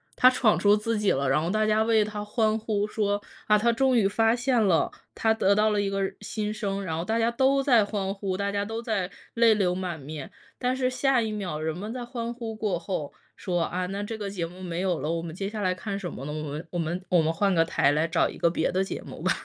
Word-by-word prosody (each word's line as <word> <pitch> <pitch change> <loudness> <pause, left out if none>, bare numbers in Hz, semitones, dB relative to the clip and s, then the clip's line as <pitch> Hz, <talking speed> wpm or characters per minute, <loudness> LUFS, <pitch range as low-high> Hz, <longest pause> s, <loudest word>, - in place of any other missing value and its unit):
他 255 0 +7
闯 250 -4 +3
出 205 0 +5
自 215 +1 -1
己 210 -2 +2
了。 135 0 0
然 135 - +3
后 170 - -1
大 215 +1 +2
家 215 +1 +3
为 220 -1 +3
他 210 0 -5
欢 215 0 +1
呼 210 -1 -1
说： 205 -1 -1 0.2
“啊， 210 - +5
他 235 +3 +3
终 260 +2 +2
于 205 -4 +4
发 225 +3 +2
现 250 -1 +1
了， 190 -6 +3 0.2
他 220 - +1
得 200 -3 +3
到 215 +1 +3
了 210 - +1
一 200 -1 0
个 195 0 -1
人 195 - -2
新 210 0 -3
生。” 200 -2 -3
然 160 -3 -3
后 170 - -3
大 225 +2 0
家 230 - +3
都 265 +3 +2
在 240 -7 +4
欢 195 -2 -2
呼， 195 -2 -3
大 200 +1 -1
家 200 0 -1
都 225 +2 -4
在 200 -6 -2 0.2
泪 230 -1 +6
流 190 -4 +1
满 180 -4 -4
面。 145 +1 -8 0.3
但 250 0 0
是 255 -1 +1
下 255 -1 +2
一 220 -1 -2
秒， 185 -7 -3
人 160 +1 -2
们 210 +5 -5
在 250 - -5
欢 240 -1 -4
呼 230 -2 -6
过 205 -5 -1
后 170 -6 -4 0.2
说： 175 -3 -1
“啊， 180 +2 -1
那 195 +2 -4
这 220 +2 -4
个 205 -2 -4
节 170 -4 -3
目 180 +2 -11
没 175 0 -3
有 180 -3 +1
了， 155 - -2
我 165 0 -1
们 165 -1 -7
接 195 +1 -3
下 215 0 -5
来 185 -1 +1
看 200 +1 -4
什 175 -4 -5
么 135 - -7
呢？ 150 - -4
我 155 - -4
们 150 +2 -6
我 175 - -2
们 175 +3 -3
我 175 -3 +4
们 160 +1 +1
换 195 +4 +1
个 165 -2 +4
台 145 -4 +2
来 155 +3 +1
找 160 - +2
一 - - -9
个 170 - +4
别 170 - 0
的 190 +1 +1
节 195 - -5
目 - - -10
吧。” - - +2
205 Hz, 295 characters per minute, -26 LUFS, 180-225 Hz, 0.3 s, 他